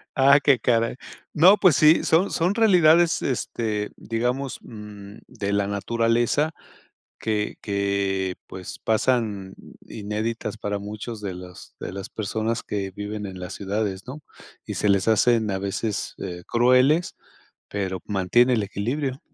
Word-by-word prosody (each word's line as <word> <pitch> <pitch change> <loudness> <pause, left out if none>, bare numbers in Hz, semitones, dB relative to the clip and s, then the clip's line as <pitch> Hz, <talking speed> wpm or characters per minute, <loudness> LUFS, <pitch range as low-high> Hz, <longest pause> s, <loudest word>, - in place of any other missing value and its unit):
Ah, 140 +2 +6
qué 135 -3 +4
caray. 115 0 +1 0.4
No, 185 +7 +7
pues 185 -6 +5
sí, 155 +2 +5
son 170 +5 +3
son 180 +4 +1
realidades, 175 -6 +5
este, 110 -5 -2
digamos, 125 +4 -2
mm, 105 -2 -11
de 100 0 -4
la 100 -1 +1
naturaleza 115 +8 +1 0.7
que 105 -2 -2
que, 100 -2 -1
pues, 95 -1 -8
pasan 110 -4 0 0.3
inéditas 110 +2 -4
para 105 -1 -2
muchos 105 +2 -7
de 100 -3 -4
los 90 0 -12
de - - -5
las 95 0 -6
personas 110 +2 -2
que 100 -2 -4
viven 105 +2 -5
en 95 -1 -8
las 90 +1 -6
ciudades, 100 0 -3
¿no? 135 +4 -8 0.5
Y - - -4
se 105 - 0
les 100 -1 +3
hacen, 110 0 +3
a 95 - -1
veces, 100 +2 -3
eh, 90 0 -6
crueles, 130 +8 +3 0.5
pero 95 -2 -3
mantiene 105 +6 +3
el 110 -3 +1
equilibrio. 130 +8 -3
110 Hz, 140 wpm, -24 LUFS, 100-125 Hz, 0.7 s, No